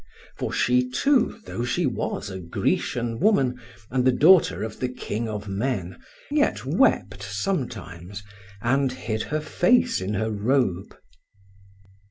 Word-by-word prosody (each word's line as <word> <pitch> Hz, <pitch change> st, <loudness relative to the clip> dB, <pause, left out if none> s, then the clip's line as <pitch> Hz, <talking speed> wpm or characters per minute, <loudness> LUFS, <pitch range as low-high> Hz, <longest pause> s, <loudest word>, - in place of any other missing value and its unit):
For -, -, -3 dB
she 125 Hz, 0 st, +2 dB
too, 250 Hz, -, +2 dB
though 120 Hz, -, -4 dB
she 155 Hz, +8 st, 0 dB
was 115 Hz, -4 st, -3 dB
a 95 Hz, -, -6 dB
Grecian 115 Hz, +6 st, -1 dB
woman, 135 Hz, -, +2 dB, 0.3 s
and 125 Hz, 0 st, +1 dB
the 130 Hz, -, +5 dB
daughter 135 Hz, -, +5 dB
of 110 Hz, -1 st, -6 dB
the 125 Hz, -, -1 dB
king 115 Hz, -2 st, -4 dB
of 105 Hz, -1 st, -5 dB
men, 100 Hz, -3 st, -3 dB, 0.3 s
yet 290 Hz, 0 st, +1 dB
wept -, -, +2 dB
sometimes, 100 Hz, -, -4 dB, 0.4 s
and 135 Hz, +2 st, +2 dB
hid 110 Hz, -3 st, -3 dB
her 155 Hz, +5 st, -2 dB
face 230 Hz, +10 st, +2 dB
in 100 Hz, +3 st, -2 dB
her 110 Hz, +3 st, -1 dB
robe. 105 Hz, -3 st, 0 dB
125 Hz, 135 wpm, -24 LUFS, 105-140 Hz, 0.4 s, the